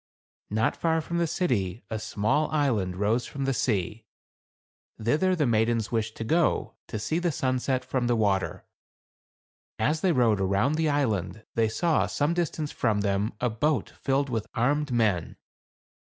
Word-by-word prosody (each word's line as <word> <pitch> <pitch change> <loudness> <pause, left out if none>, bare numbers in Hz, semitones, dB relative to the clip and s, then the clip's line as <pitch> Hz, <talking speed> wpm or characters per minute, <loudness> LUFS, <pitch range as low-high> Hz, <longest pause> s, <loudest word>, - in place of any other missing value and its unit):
Not 110 +3 +1
far 160 -1 +1
from 170 +2 -3
the 170 - +2
city 120 - -1
a 110 - -2
small 110 +8 0
island 115 -12 0
rose 105 +5 0
from 140 -1 -4
the 135 - +1
sea. 110 -1 -1 0.9
Thither 155 +12 +2
the 155 -4 +1
maidens 115 -1 +1
wished 110 -1 -2
to - - -3
go, 165 +9 +1
to - - -4
see 155 +10 -1
the 175 -1 0
sunset 130 -1 -1
from 125 -2 -1
the 120 - +2
water. 100 -4 0 1.1
As 155 +1 +1
they 185 - +3
rowed 115 - +3
around 100 +9 +2
the 160 0 +1
island, 110 - -1
they 115 -1 +2
saw, 165 +7 +1
some 150 +3 0
distance 160 -3 -2
from 110 -4 0
them, 100 +1 0
a 125 -1 0
boat 130 +2 0
filled 135 0 -1
with 110 -2 -2
armed 145 +4 +1
men. 105 -8 +1
120 Hz, 160 wpm, -27 LUFS, 110-150 Hz, 1.1 s, they